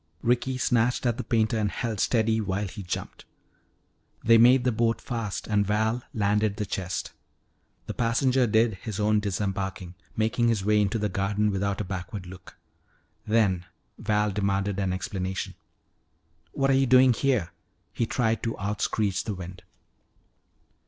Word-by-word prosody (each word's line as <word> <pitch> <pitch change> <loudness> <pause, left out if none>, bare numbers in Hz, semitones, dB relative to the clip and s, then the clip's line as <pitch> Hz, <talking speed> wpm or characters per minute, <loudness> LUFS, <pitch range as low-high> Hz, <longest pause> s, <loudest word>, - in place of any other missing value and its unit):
Ricky 125 +2 +1
snatched 125 0 +1
at 120 -1 +1
the - - -3
painter 110 -2 +1
and 105 -1 +1
held 110 -1 -3
steady 110 0 +2
while 100 0 -2
he 100 +3 -8
jumped. 90 -2 -5 1.0
They 115 0 +6
made 125 +2 +6
the 125 - +2
boat 115 0 +1
fast 115 -5 -4
and 105 -2 +2
Val 110 +4 0
landed 105 0 +1
the 105 - -2
chest. 95 -1 -4 0.7
The - - -5
passenger 125 +2 +2
did 110 -2 +2
his 110 -3 -5
own 105 0 +3
disembarking, 95 -2 -3 0.2
making 110 +2 +1
his 110 -5 +1
way 105 0 +4
into 105 +2 0
the 105 -1 0
garden 105 +2 0
without 100 +1 -1
a - - -3
backward 95 +1 -6
look. 90 -3 -12 0.7
Then 100 -5 +2 0.3
Val 105 -1 +1
demanded 100 0 -1
an 95 -2 0
explanation. 95 0 -3 1.0
"What 135 0 +1
are - - +4
you 135 0 +3
doing 130 0 +6
here?" 125 -8 0 0.4
he 115 - -1
tried 115 -2 0
to 115 - -3
out 105 +2 -3
screech 105 -3 0
the 105 - -3
wind. 90 0 -8
105 Hz, 155 wpm, -26 LUFS, 100-115 Hz, 1.0 s, They